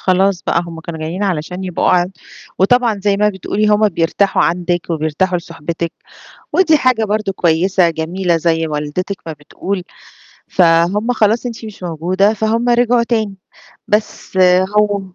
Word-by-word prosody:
خلاص 190 Hz, 0 st, +1 dB
بقى 170 Hz, -, 0 dB
هم 165 Hz, -1 st, -8 dB
كانوا 160 Hz, 0 st, -7 dB
جايين 165 Hz, +5 st, -4 dB
علشان 180 Hz, 0 st, -2 dB
يبقوا 180 Hz, -2 st, -1 dB
ع 180 Hz, -1 st, +4 dB, 0.5 s
وطبعًا 225 Hz, +1 st, +2 dB
زي 200 Hz, -1 st, +2 dB
ما 210 Hz, +1 st, +3 dB
بتقولِي 205 Hz, +1 st, -2 dB
هم 210 Hz, 0 st, +4 dB
بيرتاحوا 185 Hz, +3 st, +1 dB
عندِك، 175 Hz, 0 st, -1 dB
وبيرتاحوا 165 Hz, +3 st, 0 dB
لصحبتِك، 165 Hz, 0 st, -5 dB, 0.6 s
ودي 335 Hz, -4 st, +4 dB
حاجة 255 Hz, -5 st, +2 dB
برضه 210 Hz, -1 st, -1 dB
كويسة 175 Hz, +1 st, +2 dB
جميلة 170 Hz, +2 st, -1 dB
زي 165 Hz, 0 st, 0 dB
والدتِك 150 Hz, +6 st, -3 dB
ما 160 Hz, -, -4 dB
بتقول، 180 Hz, +6 st, -5 dB, 0.7 s
فهُم 180 Hz, +6 st, +3 dB
خلاص 225 Hz, +1 st, +1 dB
أنتِ 230 Hz, -1 st, -6 dB
مش 215 Hz, -3 st, -10 dB
موجودة 180 Hz, +4 st, +1 dB
فهُم 220 Hz, +3 st, 0 dB
رجعوا 240 Hz, 0 st, +3 dB
تاني، 220 Hz, -4 st, -1 dB, 0.5 s
بس 210 Hz, -1 st, -2 dB, 0.4 s
هو 205 Hz, -1 st, +2 dB
190 Hz, 145 wpm, -16 LUFS, 170-210 Hz, 0.7 s, ع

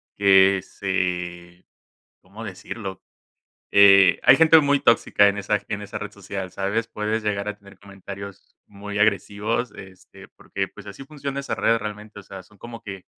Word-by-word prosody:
que 95 Hz, -1 st, +5 dB
se 90 Hz, -2 st, -4 dB, 0.6 s
¿cómo 100 Hz, +5 st, -12 dB
decirlo?, 95 Hz, 0 st, -8 dB, 0.7 s
eh, 100 Hz, -2 st, +7 dB
hay 125 Hz, +2 st, +7 dB
gente 160 Hz, 0 st, +6 dB
muy 145 Hz, -1 st, +2 dB
tóxica 105 Hz, -4 st, +3 dB
en 100 Hz, +1 st, +1 dB
esa 105 Hz, +1 st, -1 dB
en 100 Hz, 0 st, -5 dB
esa 100 Hz, -, -7 dB
red 105 Hz, -, -7 dB
social, 95 Hz, -2 st, -7 dB
¿sabes? 100 Hz, +4 st, -2 dB
Puedes 110 Hz, 0 st, -3 dB
llegar 100 Hz, 0 st, -2 dB
a 105 Hz, 0 st, -6 dB
tener 100 Hz, -1 st, -17 dB
comentarios 100 Hz, -1 st, -11 dB
muy 105 Hz, 0 st, -7 dB
agresivos, 105 Hz, +3 st, 0 dB
este, 95 Hz, -1 st, -14 dB
porque, -, -, -6 dB
pues 100 Hz, -, -14 dB
así 100 Hz, +7 st, -10 dB
funciona 140 Hz, -1 st, -6 dB
esa 140 Hz, -, -4 dB
red 115 Hz, -, +2 dB
realmente, 105 Hz, 0 st, -8 dB
o -, -, -15 dB
sea, 95 Hz, -1 st, -11 dB
son 105 Hz, +2 st, -23 dB
como 115 Hz, +2 st, -10 dB
que, 95 Hz, -2 st, -8 dB
100 Hz, 165 wpm, -23 LUFS, 95-110 Hz, 0.7 s, eh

